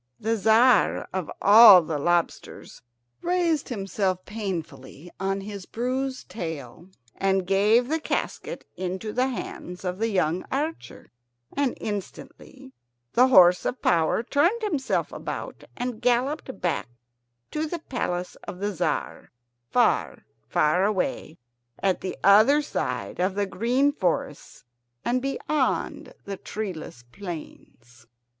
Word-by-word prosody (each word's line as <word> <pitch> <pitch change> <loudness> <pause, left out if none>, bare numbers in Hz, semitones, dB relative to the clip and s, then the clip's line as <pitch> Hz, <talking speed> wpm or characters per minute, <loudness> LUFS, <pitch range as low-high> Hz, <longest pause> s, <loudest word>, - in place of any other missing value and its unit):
The 225 +1 0
Tzar 225 +4 +4
of 185 -4 -3
all 205 -3 +9
the 155 -2 -3
lobsters 175 +3 -2 0.4
raised 340 -4 0
himself 195 -4 -2
painfully 170 -7 -6
on 195 +1 -1
his 200 -2 -8
bruised 260 +2 -3
tail 165 - -7 0.3
and 190 -1 +1
gave 210 +6 +3
the 320 +3 0
casket - - -4
into 190 +4 -4
the 255 +1 +1
hands 185 -7 -6
of 180 +1 -3
the 225 - +1
young 185 -4 0
archer, 305 +5 -4 0.4
and 280 -3 0
instantly 255 +6 -7 0.4
the 250 +2 +5
horse 180 -7 +6
of 255 - -2
power 165 +5 +2
turned 340 - +1
himself 305 -11 -1
about - - -6
and 245 -2 -4
galloped 260 +3 0
back 175 -5 -1 0.6
to 310 +1 -2
the 345 - -3
palace 180 - -3
of - - -6
the 205 +2 -2
Tzar, 175 - -3 0.4
far, - - +1 0.2
far 165 +5 +2
away, 200 - -1 0.4
at 190 -2 0
the 185 - -5
other 220 +10 +6
side - - -4
of 185 +1 0
the 205 0 0
green 245 +8 +1
forests 175 - -3 0.4
and 250 +1 +1
beyond 275 +1 -2
the 200 -1 -5
treeless 180 - -6
plains. 150 - -10
205 Hz, 125 wpm, -25 LUFS, 180-255 Hz, 0.6 s, all